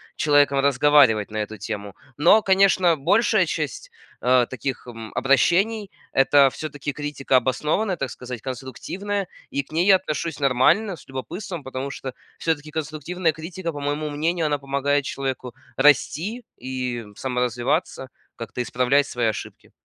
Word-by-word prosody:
человеком 145 -1 +3
разговаривать 140 -5 +4
на 110 - -6
эту 110 0 -4
тему. 100 -1 -6 0.2
Но, 175 +10 +5
конечно, 190 -3 +4
большая 200 +11 +3
часть, - - -4 0.3
э, 125 -1 +4
таких, 130 0 -5
м, 115 -2 -8
обращений 195 - +2 0.2
это 135 0 +5
всё-таки 145 0 -5
критика 145 -2 -2
обоснованная, 150 - 0
так 135 -2 -3
сказать, 125 0 -7
конструктивная, 180 - -4 0.2
и 140 - -2
к - - -24
ней 170 +3 +2
я 195 - +8
отношусь 165 -3 -4
нормально, 145 - +3
с 145 - -16
любопытством. 165 +5 -6
Потому 130 +1 -5
что 130 -2 -6 0.2
всё-таки 155 -2 -2
конструктивная 160 +3 -2
критика, 165 +3 -6
по 145 - -7
моему 145 +1 -2
мнению, 160 +3 -1
она 145 -1 0
помогает 140 +1 0
человеку 130 -2 -4 0.2
расти 160 - +2
и 125 -3 -4
саморазвиваться, 125 - -1 0.3
как-то 115 +1 -5
исправлять 125 +4 +2
свои 120 -4 -1
ошибки. 110 - -6
140 Hz, 140 wpm, -23 LUFS, 130-165 Hz, 0.3 s, я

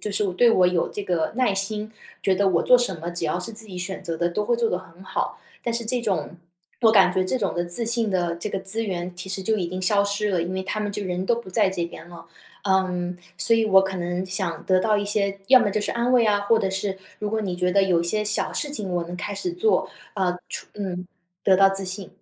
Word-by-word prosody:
就 210 - -4
是 205 +1 0
对 235 +6 +5
我 185 -5 +5
有 180 -2 +1
这 205 - -6
个 175 -4 0
耐 250 -6 +2
心， 210 +2 -2 0.3
觉 190 - +2
得 200 +1 +2
我 175 -3 +2
做 250 - +7
什 220 -8 -1
么， 170 +2 -5
只 175 -1 -4
要 160 +3 0
是 180 +5 -6
自 220 +1 -7
己 185 -4 -8
选 190 +2 -4
择 170 -3 -3
的， 170 +1 +1
都 210 +5 -2
会 235 +2 +1
做 230 -1 +1
得 - - 0
很 185 0 -12
好。 - - -3 0.2
但 235 - -1
是 235 0 -2
这 245 +2 0
种 205 -5 -1 0.5
我 225 - +7
感 190 -4 +6
觉 185 0 +1
这 185 - 0
种 200 -5 -1
的 175 - -1
自 175 +7 -1
信 230 -2 +1
的 175 -3 0
这 175 - -4
个 195 - -2
资 220 +4 0
源， 180 -2 -3
其 180 +2 -7
实 190 0 -2
就 220 +3 +1
已 180 - -1
经 185 +1 -4
消 200 +2 +3
失 200 +1 0
了， 180 -3 +1
因 175 +2 -4
为 190 0 -2
他 215 - -3
们 205 -1 -2
就 205 0 -4
人 180 0 -2
都 235 - +3
不 235 -5 -7
在 200 0 +3
这 175 -3 -2
边 170 0 -9
了。 170 -1 -12 0.4
呃， 180 -2 0 0.2
所 205 +6 +6
以 225 - +2
我 190 -3 +6
可 190 0 -3
能 175 +1 -2
想 185 -3 -3
得 185 -1 +4
到 210 +3 +2
一 205 - -1
些 200 -1 -1
要 260 - +9
么 240 -4 +2
就 210 - 0
是 - - -2
安 240 +2 0
慰 245 -2 +5
啊， 205 -1 +3
或 225 +3 +3
者 195 -3 0
是 190 0 -2 0.2
如 210 - -3
果 220 0 0
你 185 -4 -3
觉 180 0 +1
得 200 +1 +4
有 180 -3 +3
一 - - -2
些 210 +5 0
小 210 0 0
事 290 - -1
情， 210 -10 -4
我 175 - 0
能 175 +1 -7
开 205 +3 -4
始 360 - -3
做， 425 +5 +1 0.3
呃， 185 -3 0
除 - - -6
嗯， 180 -3 -4 0.4
得 190 -1 +5
到 195 0 +6
自 195 0 -1
信。 190 0 -6
195 Hz, 295 characters per minute, -24 LUFS, 180-210 Hz, 0.5 s, 要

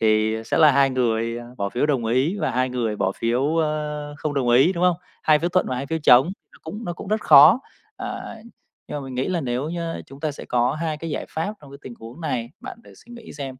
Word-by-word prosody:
thì 110 0 +2
sẽ - - -1
là 155 -2 +7
2 135 0 +4
người, 115 -2 0
à, 120 - -9
bỏ 100 - -1
phiếu 120 +8 0
đồng 135 -6 0
ý 130 - +1
và - - 0
2 130 +1 0
người 115 -4 -2
bỏ 95 -1 0
phiếu, 130 +7 0
ơ, 150 -2 -2
không 150 -1 -3
đồng 130 -3 0
ý, 135 +9 +5
đúng 175 -1 -1
không? 180 -2 +3 0.3
Hai 155 -1 +4
phiếu 170 +3 -1
thuận 180 +1 +1
và 130 - -2
hai 135 +2 -4
phiếu 160 +3 -2
chống, 125 -1 +7 0.3
nó - - -19
cũng 210 +8 -7
nó 175 - -3
cũng 175 - -9
rất 215 +1 0
khó. 155 - +7 0.4
À, - - -6 0.5
nhưng - - -4
mà - - -8
mình 130 -1 -8
nghĩ 130 +6 -1
là 180 -2 -1
nếu 130 +1 -2
như 170 -1 -4
chúng 135 +1 -13
ta 155 -1 -2
sẽ - - -10
có 125 +1 +1
2 160 -2 -2
cái 165 +2 -6
giải - - -4
pháp 165 +7 -3
trong 145 -2 -14
cái 140 - -11
tình 125 - -9
huống 115 +7 -11
này, 120 -7 -3
bạn - - -9
thử - - -16
suy 240 - -16
nghĩ 235 -2 -11
xem. 135 -3 -7
140 Hz, 265 wpm, -23 LUFS, 125-160 Hz, 0.5 s, là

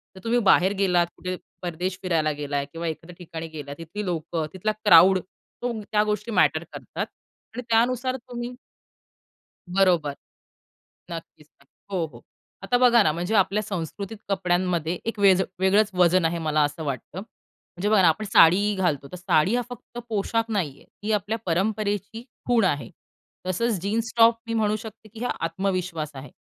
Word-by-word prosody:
तर - - -10
तुम्ही 235 +1 +2
बाहेर 190 +1 +5
गेलात, 180 -3 +3
कुठे 185 0 -4 0.3
परदेश 180 +1 -3
फिरायला 165 -4 +1
गेलात 145 -1 -3
किंवा 165 +1 -4
एखाद्या 165 +2 -6
ठिकाणी 165 -2 -7
गेलात, 145 -3 -8
तिथली 175 +6 -6
लोकं, 165 -2 -2
तिथला 190 +3 -1
क्राउड 185 +3 +8
तो 235 +6 -8
त्या 210 0 +1
गोष्टी 210 +1 -2
मॅटर 170 -5 +3
करतात - - -5 0.5
आणि 245 - -4
त्यानुसार 245 +3 +2
तुम्ही 245 -1 -7 1.1
बरोबर, 175 -6 +2 1.0
नक्कीच, 165 -2 -9 0.2
नक्की. 140 - -30 0.2
हो, 180 -3 0
हो, 155 - -15 0.4
आता 245 - +2
बघा 240 -2 +6
ना, 155 - +2
म्हणजे 175 +7 -2
आपल्या 195 +1 +3
संस्कृतीत 195 +2 -5
कपड्यांमध्ये 180 -3 0
एक 230 -1 -3
व्हेज 190 -2 +5 0.2
वेगळंच 200 +3 +3
वजन 180 0 +4
आहे 165 +1 +1
मला 155 -2 +1
असं 145 +2 -3
वाटतं. 140 +4 -5
म्हणजे 200 -2 -8
बघा 210 -2 +5
ना 175 - +6
आपण 165 +7 0
साडी 200 +1 +5
घालतो 155 -8 -1
तर - - -5
साडी 180 +2 +2
हा 245 - +1
फक्त 240 0 -10
पोशाख 225 +1 0
नाही 195 -9 0
आहे, - - -19 0.2
ती 215 +1 -1
आपल्या 210 +2 0
परंपरेची 205 +4 -1 0.2
खूण 240 -3 +3
आहे. 145 -9 0 0.6
तसंच 210 +4 0
जीन्स 220 +5 -1
टॉप 230 0 +6
मी 230 - -3
म्हणू 215 -1 +1
शकते 220 0 -11
की 225 +3 -7
हा - - 0
आत्मविश्वास 180 -2 -2
आहे 135 -1 -9
190 Hz, 165 wpm, -25 LUFS, 165-215 Hz, 1.1 s, क्राउड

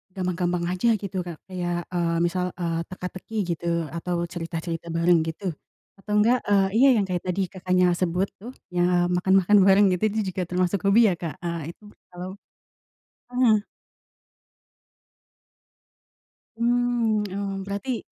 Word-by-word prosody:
gampang-gampang 180 -1 -1
aja 185 +6 0
gitu, 195 -2 -4
Kak. 175 -2 -5 0.2
Kayak, 175 -1 -2
eee, 170 -2 0
misal, 180 +1 0
eee, 170 -2 -2
teka-teki 185 +4 -8 0.2
gitu, 170 +1 -4 0.3
atau 170 +1 -2
cerita-cerita 170 -1 -5
bareng 170 +1 +3
gitu, 175 +3 -3 0.5
atau 210 - -9
enggak, 235 +4 +4
eee 195 -1 +4
iya, 275 - +7
yang 205 - +2
kayak 180 -2 -3
tadi 180 +2 0
Kakaknya 185 -1 +2
sebut, 180 +2 0
tuh 245 +5 -9 0.2
ya, 175 0 0 0.3
makan-makan 190 +3 +4
bareng, 195 +1 +6
gitu. 180 +3 -1
Itu 215 +1 -2
juga 185 - -3
termasuk 180 +2 0
hobi 215 +4 +6
ya, - - +1
Kak, 160 -5 -5
eee 170 -1 -4
itu - - -28 0.2
kalau 185 +3 -8 1.0
mhm. 220 -4 +3 2.9
Mmm, 235 -2 +1
oh, 200 0 -3
berarti 215 +5 -3
185 Hz, 135 wpm, -25 LUFS, 175-205 Hz, 2.9 s, iya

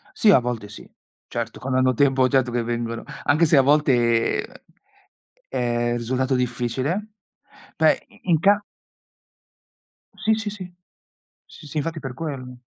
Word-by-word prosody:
Sì, 210 - +5
a 150 - +7
volte 120 -4 -4
sì. 105 - -12 0.4
Certo, 115 -1 -5
quando 130 0 0
hanno 130 0 +3
tempo, 135 0 +3
certo 130 -2 +1
che 120 -1 -1
vengono, 115 0 -3 0.2
anche 160 +4 +3
se 155 - +3
a - - +8
volte, 125 -5 +1 0.8
è 120 -2 -1
risultato 130 +3 -1
difficile, 125 - -2 0.7
beh, - - +2
i - - -21
in 160 - +4
ca 200 +3 +4 1.6
Sì, 220 - +1
sì, 220 -1 -3
sì. 185 -3 -8 0.7
Sì, - - -14
sì 145 - -10
infatti 160 +2 -2
per 130 -3 -6
quello. 130 -4 -6
130 Hz, 140 wpm, -23 LUFS, 120-150 Hz, 1.6 s, a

